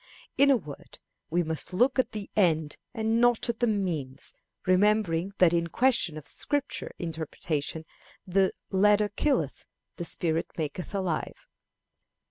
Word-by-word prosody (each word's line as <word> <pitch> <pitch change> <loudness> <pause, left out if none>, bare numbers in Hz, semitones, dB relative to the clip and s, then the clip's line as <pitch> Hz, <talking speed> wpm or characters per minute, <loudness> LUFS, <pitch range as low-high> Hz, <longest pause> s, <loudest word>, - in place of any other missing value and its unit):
In 280 +1 +5
a 270 - +6
word, 150 -9 -11 0.3
we 175 +2 +1
must 160 +3 -4
look 250 +8 +3
at 260 - +2
the 210 -2 -6
end 160 -6 +2
and 225 0 0
not 240 -1 +3
at 230 - -2
the 240 - +2
means, 165 - -2 0.3
remembering 190 -1 +2
that 175 -2 +5
in 170 0 +1
questions 230 -6 +2
of 150 - -9
Scripture 285 - -1
interpretation 160 -1 -3 0.4
the 190 +1 +2 0.2
"letter 210 +2 +4
killeth, 280 +7 -1 0.3
the 175 - -4
spirit 165 -1 -1
maketh 160 +5 -4
alive." 185 -5 -3
185 Hz, 135 wpm, -28 LUFS, 160-220 Hz, 0.4 s, a